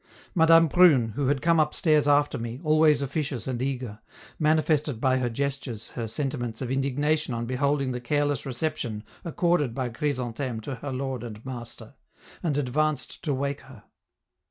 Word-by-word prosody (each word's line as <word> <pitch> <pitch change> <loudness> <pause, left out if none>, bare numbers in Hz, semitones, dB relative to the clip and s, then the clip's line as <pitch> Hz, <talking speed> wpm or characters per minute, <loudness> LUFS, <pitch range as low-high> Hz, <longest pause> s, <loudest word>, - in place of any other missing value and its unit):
Madame 165 -1 +6
Prune, 150 -8 +5
who 130 +5 -2
had 140 0 0
come 170 0 +4
upstairs 155 -1 +3
after 145 -2 +3
me, 115 +2 -5
always 155 -2 +4
officious 140 -2 -3
and 125 -2 -3
eager, 125 -5 -3 0.4
manifested 155 -4 +2
by 130 +1 +2
her 125 -1 0
gestures 135 -3 -4
her 115 -2 -5
sentiments 120 -2 -3
of 130 -2 -4
indignation 140 +1 0
on 115 0 -3
beholding 135 +2 0
the 125 -1 -4
careless 145 +2 0
reception 125 -5 -3 0.2
accorded 170 -6 +1
by 130 -2 -2
Chrysantheme 125 -2 -3
to 135 - -5
her 140 +4 -6
lord 130 -2 -3
and 110 -1 -9
master, 120 -3 -8 0.5
and 150 -5 0
advanced 145 +1 -1
to 155 - -1
wake 140 +1 -2
her. 130 -5 -15
135 Hz, 155 wpm, -26 LUFS, 125-150 Hz, 0.5 s, Madame